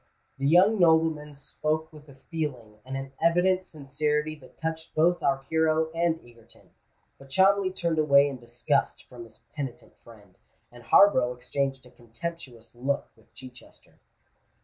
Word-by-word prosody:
The 140 - 0
young 190 +7 +5
nobleman 160 -3 +2
spoke 155 +3 -3
with 150 -1 -15
a 140 - -14
feeling 130 -8 -6
and 135 +1 -5
an 135 0 -7
evident 180 +3 +2
sincerity 150 0 -2
that 130 -3 -19
touched 160 0 -5
both 170 +3 +2
our 135 -1 0
hero 160 +2 +1
and 165 -1 0
Egerton; 115 -1 -20 0.5
but 135 - -15
Cholmondeley 190 +5 +3
turned 170 -3 -1
away 140 -2 +5
in 135 -3 -6
disgust 120 +4 -1
from 120 -2 -11
his 115 +1 -19
penitent 135 -5 -7
friend, - - -19 0.3
and 120 0 -14
Harborough 125 - +4
exchanged 135 +1 -3
a 125 - -17
contemptuous 120 -1 -9
look 135 +4 -2
with - - -27
Chichester. 125 -1 -15
145 Hz, 150 wpm, -26 LUFS, 130-160 Hz, 0.5 s, young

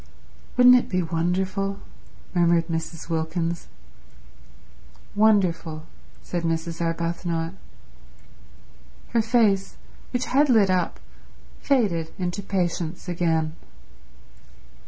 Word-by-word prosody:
"Wouldn't 250 0 +8
it 250 - +2
be 185 -1 0
wonderful?" 185 +4 -1 0.6
murmured 170 -1 +3
Mrs. 165 0 -4
Wilkins. 165 +1 -2 1.5
"Wonderful," 185 -7 +2 0.4
said 175 - -3
Mrs. 165 0 -2
Arbuthnot. 170 0 -2 1.6
Her 230 - +2
face, 220 -4 +2 0.3
which 250 0 -1
had 285 +3 +3
lit 215 -6 +5
up, 180 -2 0 0.6
faded 195 - +1
into 180 +2 -2
patience 175 -3 -2
again. 165 -3 0
175 Hz, 85 wpm, -24 LUFS, 165-200 Hz, 1.6 s, Wouldn't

